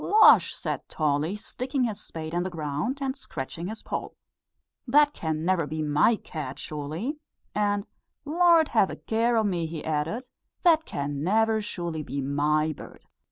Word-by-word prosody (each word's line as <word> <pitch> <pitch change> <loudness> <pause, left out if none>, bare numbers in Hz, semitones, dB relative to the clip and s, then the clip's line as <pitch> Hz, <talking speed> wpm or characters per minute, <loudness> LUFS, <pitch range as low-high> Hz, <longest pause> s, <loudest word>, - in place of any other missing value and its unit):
"Losh!" 435 +1 +6
said - - -4
Tolly, 155 +4 0
sticking 255 +5 -3
his 220 -4 -2
spade 160 0 -7
in 175 - +1
the 185 - -2
ground 155 - -2
and 270 -1 -1
scratching 165 - -6
his 220 +2 -7
poll, - - -4 0.7
"that 295 +3 +5
can 160 -1 -3
never 175 -4 +2
be 155 +1 -3
my 150 +10 +4
cat 150 -9 -6
sure_ly_!" 155 - -4 0.4
and 205 -1 +1 0.4
"Lord, 330 0 +5
have 215 -5 +3
a - - -5
care 230 +1 +1
o' 220 - +3
me!" 175 -5 0
he 160 -1 -6
added; 160 - -2 0.4
"that 325 -3 +5
can 140 0 -3
never 220 +4 +3
surely 170 -6 -4
be 140 -1 -4
my 150 +3 +1
bird." - - -12
175 Hz, 160 wpm, -27 LUFS, 155-235 Hz, 0.7 s, Losh